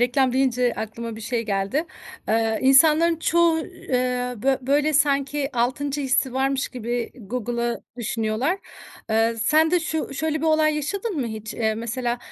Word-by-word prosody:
reklam 250 +1 +2
deyince 250 -2 +2
aklıma 225 +1 -5
bir - - -9
şey 230 +1 -2
geldi. 200 - -1 0.4
Eee, 225 0 +1
insanların 310 +5 +5
çoğu, 330 0 +3
eee, 250 -4 -2
bö 265 +4 +1
böyle 295 +2 +2
sanki 280 0 +1
6'ncı 275 +4 0
hissi 265 -1 +1
varmış 270 +1 0
gibi 240 -1 -3
Google'ı 235 +1 -3
düşünüyorlar. 235 - -1 0.5
Iıı, 225 +1 +2
sen 310 +7 +3
de 355 - +3
şu 320 -4 -3
şöyle 315 +2 -1
bir 325 - -1
olay 310 -1 +3
yaşadın 390 +7 -3
mı 240 - -1
hiç? 220 -1 -6
Eee, 220 -1 0
mesela, 235 +2 -2
255 Hz, 150 wpm, -23 LUFS, 235-295 Hz, 0.5 s, insanların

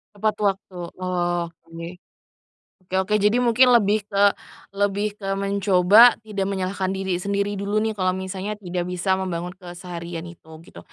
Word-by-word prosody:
Tepat 215 +1 0
waktu 195 -2 -1 0.2
oh 175 -1 -1 0.3
oke, 165 0 -7 1.0
oke 190 - -4
oke 210 - -3
jadi 210 +5 +3
mungkin 245 +1 +5
lebih 210 -2 +2
ke 200 -1 +1 0.5
lebih 205 +1 0
ke 195 -1 -2
mencoba 200 +3 +5
tidak 200 -3 -3
menyalahkan 190 0 -2
diri 190 -2 -2
sendiri 200 +1 -2
dulu 205 +2 0
nih 220 - 0
kalau 185 -3 0
misalnya 190 +2 -4
tidak 180 -3 -4
bisa 185 +1 0
membangun 180 -1 -3
keseharian 175 -2 -8
itu 170 -2 -13 0.2
gitu. - - -13
195 Hz, 150 wpm, -23 LUFS, 180-205 Hz, 1.0 s, mungkin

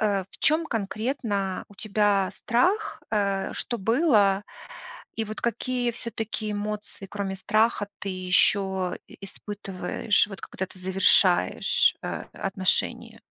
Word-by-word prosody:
э, 200 -3 +1
в - - -15
чём 315 +2 +3
конкретно 215 -3 -2
у 205 - -16
тебя 205 -1 +1
страх? 370 - +1
Э, 200 -2 0
что 240 - -3
было, 210 - +3 0.7
и 225 - 0
вот 215 +1 -6
какие 245 +1 0
всё-таки 225 -2 -3
эмоции, 210 -1 -4
кроме 195 -1 -3
страха, 215 +2 +2
ты 200 - -4
ещё 185 0 +2
и - - -14
испытываешь, 195 0 -1
вот 195 -2 -9
когда 190 - -4
ты 185 0 -16
завершаешь, 190 +1 +3
э, - - -4 0.3
отношения? 190 -1 -1
205 Hz, 120 wpm, -26 LUFS, 195-225 Hz, 0.7 s, чём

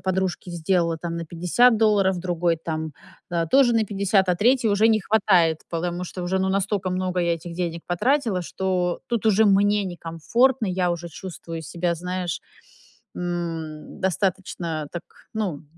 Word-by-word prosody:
подружке 190 -1 -2
сделала 170 -1 0
там 170 0 -4
на 170 - -4
50 180 +9 +3
долларов, 200 -4 +3
другой 175 -2 0
там, 160 -1 -3 0.4
э, 170 -1 0
тоже 270 -3 +5
на 225 -1 +3
50, 195 -1 +1
а 180 - +4
3 240 +5 +3
уже 210 +2 +4
не 220 -1 +3
хватает, 185 -6 +3
потому 175 +1 -2
что, 180 0 -6
уже 180 +2 0
ну 190 0 +1
настолько 195 -1 0
много 185 0 -1
я 170 -1 +2
этих 170 +1 -8
денег 170 -1 -3
потратила, 210 +1 +1
что 180 0 -1
тут 235 -2 -2
уже 220 0 +4
мне 205 +1 +3
некомфортно. 195 +9 +1
Я 180 -1 0
уже 170 0 -4
чувствую 165 -1 -7
себя, 170 +2 -1
знаешь, 180 -1 -3 0.7
м, 165 -3 -4
достаточно 180 -4 -1
так 175 - -5 0.3
ну, 210 -6 -1
м 150 - -15
180 Hz, 160 wpm, -24 LUFS, 170-200 Hz, 0.7 s, тоже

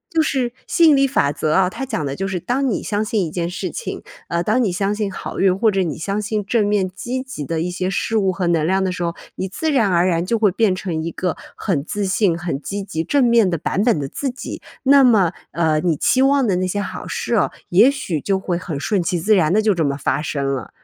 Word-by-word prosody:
就 320 - +5
是 260 -6 0
吸 340 - +4
引 310 -3 +7
力 275 0 +4
法 200 - +1
则 155 +1 -1
啊， 185 +1 +4
它 265 +5 -5
讲 160 - -2
的 135 - -3
就 195 +4 -3
是， 190 -2 -2
当 260 +8 0
你 220 - -2
相 205 0 -1
信 215 -3 0
一 155 - -6
件 170 0 -2
事 180 - -4
情， 480 - -6 0.2
呃， 170 0 -1
当 250 +6 +2
你 205 - +1
相 195 +3 0
信 210 -2 -2
好 - - -6
运， 190 -1 +3
或 220 +1 +3
者 195 -1 +1
你 165 -4 -2
相 200 +5 -2
信 210 -1 -2
正 210 -1 +1
面 205 -2 +1
积 240 +8 -4
极 205 - -7
的 165 +3 -2
一 180 - -2
些 185 +1 -2
事 195 +4 -1
物 195 -2 +2
和 185 0 -2
能 165 -2 +1
量 190 +1 +2
的 190 - 0
时 180 - -5
候， 170 -1 -1 0.2
你 190 - -2
自 310 - -2
然 235 -8 +3
而 175 0 +3
然 170 -2 +1
就 230 +5 0
会 210 -3 +3
变 200 0 +2
成 175 -4 -3
一 165 - -2
个 180 0 -2 0.2
很 165 -9 -1
自 205 +5 -3
信， 185 -3 +1
很 170 -5 -4
积 200 +6 -4
极 160 -4 -3
正 280 +8 +2
面 235 -5 +4
的 170 - -1
版 190 +5 -1
本 225 -10 +2
的 140 - -3
自 270 - -3
己。 250 - -7 0.2
那 275 0 +6
么， 210 -9 +4 0.2
呃 160 -2 +1
你 165 -2 0
期 260 - +2
望 275 0 +4
的 195 -5 +1
那 185 0 0
些 205 +3 -2
好 205 - -5
事 - - -3
哦， - - +2 0.2
也 200 +9 +6
许 185 - -3
就 195 +4 0
会 180 -2 -2
很 165 -6 -5
顺 195 +4 0
其 175 0 -1
自 215 +6 +3
然 165 -5 +3
地 215 +3 +3
就 210 -2 +3
这 170 - 0
么 140 -1 -1
发 145 +1 -1
生 145 -2 -2
了。 130 -4 -5
190 Hz, 290 characters per minute, -20 LUFS, 170-220 Hz, 0.2 s, 引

